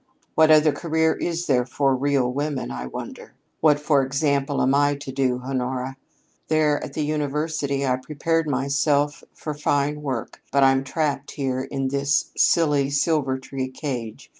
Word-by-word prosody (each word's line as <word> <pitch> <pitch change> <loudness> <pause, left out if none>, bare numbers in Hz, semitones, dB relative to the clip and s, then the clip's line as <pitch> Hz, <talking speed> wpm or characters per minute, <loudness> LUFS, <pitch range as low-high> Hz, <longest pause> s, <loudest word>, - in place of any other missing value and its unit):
"What 160 0 +5
other 155 0 +6
career 160 +2 +1
is 170 0 -3
there 125 -5 +2
for 135 +2 +1
real 135 -2 +1
women, 145 0 -2
I 65 0 -5
wonder? - - -8 0.2
What, 150 -2 +4
for 150 -2 +3
example, 140 +1 0
am 130 +2 +3
I 145 0 +3
to 140 -1 -7
do, 130 -2 0
Honora? 130 0 -2 0.5
There 155 -2 +2
at 140 - -7
the 150 0 -1
University 150 -1 -1
I 130 -1 +1
prepared 155 +4 -1
myself 140 +2 +1
for 155 - -5
fine 145 0 0
work, 130 -6 -4
but 140 +2 +4
I'm 135 0 +4
trapped 140 0 -2
here 130 -2 -2
in 135 -1 -2
this 140 +2 0
silly 145 -4 +3
Silvertree 135 -3 -1
cage. 120 -7 -5
140 Hz, 155 wpm, -23 LUFS, 135-150 Hz, 0.5 s, other